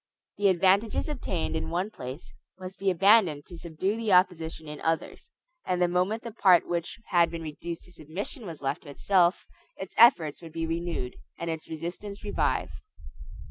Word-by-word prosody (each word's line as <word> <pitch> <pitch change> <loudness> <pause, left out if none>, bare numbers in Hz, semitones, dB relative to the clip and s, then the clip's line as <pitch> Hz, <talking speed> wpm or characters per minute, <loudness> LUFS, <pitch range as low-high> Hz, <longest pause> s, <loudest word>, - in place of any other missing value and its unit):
The 205 - +4
advantages 195 +4 +3
obtained 200 - -3
in 160 - -2
one 180 +5 -2
place 130 -3 -8 0.2
must 185 0 -9
be 195 - +1
abandoned 185 -5 +4
to 175 - -11
subdue 175 +5 -2
the 225 -4 0
opposition 165 -3 +2
in 150 0 -7
others; 165 - -2 0.3
and 180 - -1
the 180 - +4
moment 180 +5 0
the 235 - -6
part 190 -5 +4
which 170 +4 -3
had 170 -2 +4
been 165 -1 -6
reduced 165 +2 -6
to 180 - -15
submission 185 - -7
was 160 -4 -8
left 135 - -1
to 145 - -13
itself, 175 +4 +2 0.3
its 190 - -7
efforts 175 - +6
would 165 -2 -11
be 165 0 -2
renewed, 165 -6 -3 0.2
and 170 -1 -3
its 160 -1 -6
resistance 175 +6 -6
revive. 205 - 0
175 Hz, 175 wpm, -28 LUFS, 160-195 Hz, 0.3 s, efforts